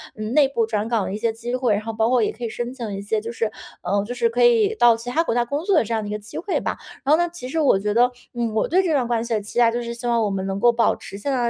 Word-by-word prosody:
嗯， 215 +1 -5
内 290 -2 +5
部 235 -4 0
转 215 -1 -2
岗 230 -4 0
的 - - -4
一 210 - -2
些 225 0 0
机 240 +2 -5
会， 250 -4 +1
然 205 - 0
后 225 - -4
包 220 +1 +1
括 250 -3 +3
也 - - 0
可 240 - -11
以 - - -3
申 240 +2 -4
请 230 -6 -5
一 195 - -5
些 215 +2 -1
就 230 +2 -6
是 225 -2 -1 0.3
呃， 200 +3 0
就 245 - -5
是 465 - +2
可 - - -1
以 450 -3 +4
到 240 - +5
其 235 +2 -7
他 320 +6 +2
国 230 - -1
家 240 - +3
工 285 +5 -3
作 400 - +3
的 310 - +4
这 230 +2 -4
样 220 - 0
的 - - -6
一 - - -4
个 210 - -2
机 210 +1 -9
会 385 +2 -1
吧。 - - -3 0.3
然 280 - +1
后 310 - +6
呢， 345 0 +1
其 255 -7 -7
实 325 - -1
我 280 -10 +4
觉 205 +1 -1
得， 245 +2 +4 0.2
嗯， 235 -2 -2
我 220 - +1
对 370 +4 +3
这 330 -4 0
段 260 -4 +2
关 230 -1 0
系 235 - -2
的 215 - 0
期 210 +4 -4
待， 235 - +6
就 240 +1 -2
是 235 0 -5
希 240 +1 -6
望 235 -1 +2
我 210 - 0
们 190 -1 -3
能 195 0 -2
够 240 +2 +5
保 230 0 +2
持 195 - -10
现 245 +8 -4
在 250 -2 0
235 Hz, 385 characters per minute, -22 LUFS, 215-255 Hz, 0.3 s, 后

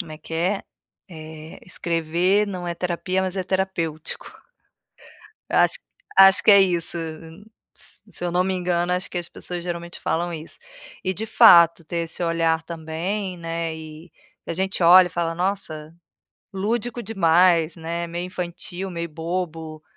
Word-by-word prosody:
como 165 -5 -6
é 155 - -9
que 165 - -13
é? 180 +5 0 0.5
Eh, 160 -1 -10
escrever 175 +3 0
não 185 -3 -5
é 170 - -2
terapia, 180 +2 -2
mas 190 0 -3
é 190 - 0
terapêutico. 175 -5 -3 1.2
Eu - - +1
acho - - +3 0.4
acho 195 0 +8
que - - +5
é 200 - +8
isso, 175 -3 0
m 165 +3 -8 0.3
s - - -17
se - - -10
eu 175 - -1
não 180 +1 +2
me 190 0 -1
engano, 175 -1 0
acho 180 +1 -2
que - - -3
as 170 - -8
pessoas 175 -1 -7
geralmente 170 -1 -6
falam 170 +1 -1
isso. 160 0 -8 0.5
E, 185 - 0
de 215 +4 -5
fato, 170 -5 +7
ter 170 - -4
esse 165 +2 -2
olhar 165 -1 +1
também, 170 +4 -4
né, 165 -1 -4
e 160 +1 -11 0.4
que - - -13
a - - -3
gente 190 +1 -2
olha 180 +2 +8
e - - -13
fala: 165 -1 -2
"Nossa, 165 -4 -3 0.6
lúdico 235 +5 -2
demais, 175 -5 +3
né, 170 +1 -4
meio 170 +1 -4
infantil, 180 +1 -5
meio 170 -1 -4
bobo", 160 -1 -5
170 Hz, 165 wpm, -23 LUFS, 165-185 Hz, 1.2 s, acho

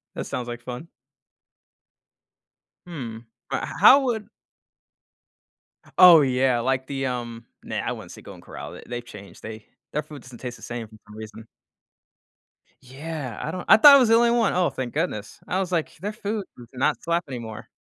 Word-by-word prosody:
That - - -4
sounds 125 -1 -4
like 120 0 -6
fun. 125 +6 -7 2.0
Hmm, 120 -10 -7 0.3
but - - -2
h - - -4
how 275 - +9
would 225 -6 -2 1.7
Oh 175 -4 +10
yeah, 130 -2 +2
like 130 +2 -1
the, 135 -1 -3
um, 120 -2 -5 0.2
nah, - - -5
I - - -2
wouldn't - - -10
say - - -12
Golden - - -12
Corral, - - -9
they - - -11
they've 120 0 -6
changed, 100 -4 -13
they 110 -1 -9 0.3
their 150 - -1
food 150 -2 -11
doesn't 125 -3 -13
taste 125 -2 -7
the - - -17
same 120 -2 -6
for 110 - -17
some 105 - -13
reason. 110 +1 -10 1.4
Yeah, 135 -2 -7
I 155 - -3
don't 180 +1 -6
I 220 - +8
thought 280 +5 +10
it - - +7
was 245 -4 +3
the 225 - +6
only 235 0 +4
one, 235 -3 +2
oh 180 -1 +2
thank 125 -2 -5
goodness. 125 - -3
I 185 - -1
was 185 -1 -2
like, 165 -3 -1
"Their 205 +6 -5
food 210 0 -4
does 120 - -12
not 130 0 0
slap 170 +1 0
anymore." 115 -5 -7
130 Hz, 185 wpm, -24 LUFS, 120-180 Hz, 2.0 s, Oh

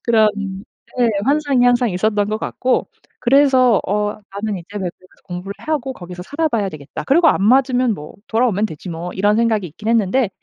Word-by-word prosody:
그런 220 -2 +4 0.7
예, 240 - +4 0.2
환상이 280 -3 +2
항상 245 -1 +3
있었던 205 +2 0
것 215 - -1
같고 255 +2 -1 0.3
그래서 255 -4 +4
'어 210 +1 -1 0.2
나는 205 -1 -2
이제 170 - -13
외국에 185 -1 -5
가서 - - -27
공부를 185 +2 -6
하고 280 -4 -3
거기서 180 0 -9
살아 310 - -1
봐야 210 -7 0
되겠다. 150 -4 -8
그리고 325 +4 +5
안 195 - +2
맞으면 250 0 +3
뭐 150 -2 -10
돌아오면 220 -3 +1
되지 170 +1 -8
뭐.' 170 +2 -5
이런 205 +2 +2
생각이 220 -4 +1
있긴 210 +8 -7
했는데 230 +1 +2
220 Hz, 385 characters per minute, -19 LUFS, 190-255 Hz, 0.7 s, 그리고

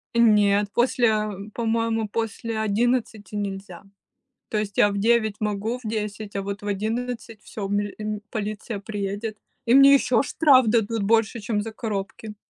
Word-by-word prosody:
Нет, 210 -3 +4
после, 240 0 +2
э, 210 -2 -1
по-моему, 225 -1 0
после 225 +1 -3
11 220 -1 -1
нельзя. 195 -3 -5 0.7
То 215 - -1
есть 205 -2 -4
я 205 - +5
в 200 - -3
9 220 -1 +2
могу, 210 +3 -2
в - - -5
10, 210 -1 -4
а 200 - -1
вот 200 +1 -5
в 205 - -7
11- 225 +2 -3
всё, 205 -3 -6
миль 205 0 -2
м 210 -1 -4
полиция 215 0 -4
приедет. 205 +1 -4 0.3
И 235 - +3
мне 275 +1 +8
ещё 255 -4 +3
штраф 275 -5 +4
дадут 225 0 +1
больше, 225 +2 +2
чем 210 0 -1
за 225 +2 -6
коробки. 215 -1 -5
215 Hz, 160 wpm, -24 LUFS, 205-230 Hz, 0.7 s, мне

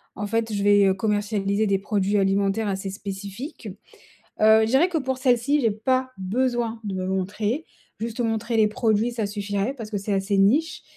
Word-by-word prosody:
en 205 - -4
fait, 225 +1 -1
je 200 - -1
vais, 205 0 +5
heu, 190 - +3
commercialiser 205 0 0
des 200 -2 +1
produits 200 0 0
alimentaires 195 +2 +1
assez 195 0 -3
spécifiques. 200 - -7 0.7
Heu, 220 +1 +6
je - - +3
dirais 265 +9 +4
que 360 -3 -2
pour 265 -3 -2
celle-ci, 260 +2 +2
j'ai 225 -3 +2
pas 255 +5 0
besoin 235 +3 -1
de 200 -2 -4
me 185 0 -3
montrer, 205 - -2 0.3
juste 225 +1 -5
montrer 225 0 -1
les 220 -1 +4
produits, 220 0 +1
ça 230 -3 -2
suffirait. 205 +3 -2
Parce 225 -5 -7
que 205 - -1
c'est 200 +1 -3
assez 195 +1 0
niche 265 +12 +2
215 Hz, 185 wpm, -24 LUFS, 200-235 Hz, 0.7 s, Heu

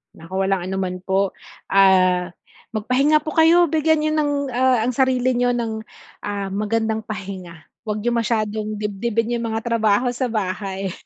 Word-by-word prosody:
Naku 185 +4 -3
walang 195 -1 +1
ano 190 - -3
man 185 -1 -2
po. 190 +1 0 0.4
Ah, 185 -2 +4 0.4
magpahinga 275 +8 +2
po 310 - -4
kayo, 335 +2 +5
bigyan 315 0 +2
nyo 310 - +1
ng, 290 -1 +1 0.2
ah, 250 -2 +2
ang 250 - +1
sarili 255 0 +2
nyo 245 0 +2
ng, 230 -2 -2 0.5
ah, 200 -1 -3
magandang 220 +2 -1
pahinga, 190 -6 -7 0.2
huwag 210 0 -2
nyo 240 - +1
masyadong 215 -2 -1
dibdibin 225 +3 -1
yung 230 - -3
mga 220 0 -2
trabaho 230 +1 +2
sa 250 +1 -2
bahay. 195 -3 -3
215 Hz, 155 wpm, -21 LUFS, 195-245 Hz, 0.5 s, kayo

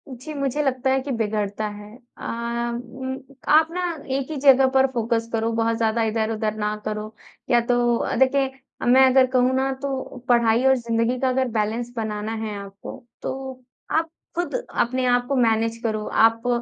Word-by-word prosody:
जी, 260 +4 -8
मुझे 275 0 -1
लगता 265 -1 0
है 265 0 +3
कि 275 +1 -5
बिगड़ता 215 -2 -1
है। 210 +1 -10 0.2
अ, - - -15 0.8
उम, 260 0 -4 0.3
आप 315 +1 +6
ना 360 +1 -3 0.3
एक 275 +2 -3
ही 305 - -3
जगह 270 -1 +6
पर 265 0 +5
फ़ोकस 230 -2 -1
करो, 225 0 0
बहुत 230 0 +1
ज़्यादा 225 0 +1
इधर-उधर 220 -1 -1
ना 210 0 -1
करो 215 0 -4 0.4
या 240 - +5
तो 240 0 +2
अ, - - -2
देखिए 265 +1 +2 0.4
मैं 260 +2 +7
अगर 260 0 +5
कहूँ 255 0 +3
ना 265 +1 +1
तो 270 -2 -4
पढ़ाई 235 0 +4
और 265 0 +6
ज़िंदगी 235 0 0
का 260 - +1
अगर 260 0 +1
बैलेंस 225 +3 -1
बनाना 215 0 -3
है 210 -1 -4
आपको 200 0 -9 0.2
तो 265 -1 -6 0.3
आप 325 +1 +1 0.3
ख़ुद 350 +6 -2
अपने 255 - -1
आप 245 0 +2
को 275 - 0
मैनेज 230 -2 +2
करो। 215 -2 -1
आप 225 +2 +3
240 Hz, 175 wpm, -23 LUFS, 225-265 Hz, 0.8 s, मैं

